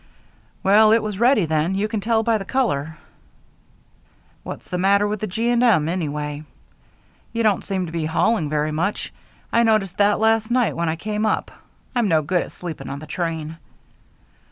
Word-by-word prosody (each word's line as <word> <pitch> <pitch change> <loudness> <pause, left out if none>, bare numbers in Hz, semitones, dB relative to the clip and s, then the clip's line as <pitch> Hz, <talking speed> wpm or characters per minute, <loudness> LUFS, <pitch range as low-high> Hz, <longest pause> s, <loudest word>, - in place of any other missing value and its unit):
"Well, 215 +2 +6
it 225 - +3
was 210 -2 -4
ready 235 -5 +4
then. 160 +4 0
You 205 +2 0
can 215 -1 -3
tell 225 +1 +1
by 225 -1 +1
the - - -5
color." 160 - -1 1.4
"What's - - -8
the 180 - -1
matter 200 +2 +3
with 210 0 -3
the 215 - -3
G. 225 +5 -2
& 240 0 +2
M. 200 -11 +4
anyway? 150 -3 -3 0.9
They 230 0 0
don't 210 -3 +2
seem 190 -2 -2
to 165 - -8
be 165 -1 -2
hauling 160 +1 +1
very 150 0 0
much. 170 +7 -2 0.4
I 235 - +4
noticed 215 -5 +1
that 205 0 +3
last 220 0 +2
night 245 -1 +1
when 170 0 -1
I 160 - -1
came 210 +5 -3
up. 215 - 0 0.4
I'm 240 -4 +1
no 160 -4 +2
good 175 +4 +1
at - - -7
sleeping 170 -3 -7
on 140 - -5
the 155 - -9
train." 160 0 -4
195 Hz, 185 wpm, -22 LUFS, 160-220 Hz, 1.4 s, Well